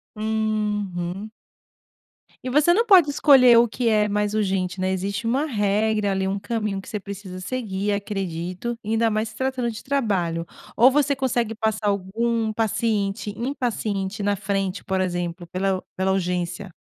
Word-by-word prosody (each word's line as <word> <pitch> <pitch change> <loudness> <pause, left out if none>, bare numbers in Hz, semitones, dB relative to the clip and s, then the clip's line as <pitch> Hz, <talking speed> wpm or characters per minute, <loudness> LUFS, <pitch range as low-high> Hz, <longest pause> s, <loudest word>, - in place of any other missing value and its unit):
Uhum. 210 -3 -2 1.1
E 255 - -3
você 300 +6 +4
não 460 +5 +2
pode 365 -9 +6
escolher 260 -5 +6
o 235 0 +6
que 235 +1 -1
é 210 -1 +3
mais 210 0 0
urgente, 190 -3 -1
né, 185 0 0
existe 200 +4 -3
uma 270 +6 +1
regra 210 -3 +1
ali, 190 0 0
um 195 +1 -1
caminho 210 -2 -2
que - - -16
você 210 - -3
precisa 195 -2 -8
seguir, 205 -2 -2
acredito, 195 +2 -3
ainda 225 +1 +2
mais 215 +1 -1
se 220 - -14
tratando 260 -2 -1
de 220 - -7
trabalho. 190 -11 0 0.3
Ou 245 +3 +8
você 285 0 +2
consegue 240 -4 0
passar 220 -1 -1
algum 220 +3 0
paciente 215 -2 -1
impaciente 220 -6 -2
na 205 -1 +1
frente, 195 -1 -2
por 190 0 0
exemplo, 175 -1 -3
pela 190 +1 -1
pela 190 0 +1
urgência? 180 0 -2
210 Hz, 155 wpm, -23 LUFS, 190-230 Hz, 1.1 s, Ou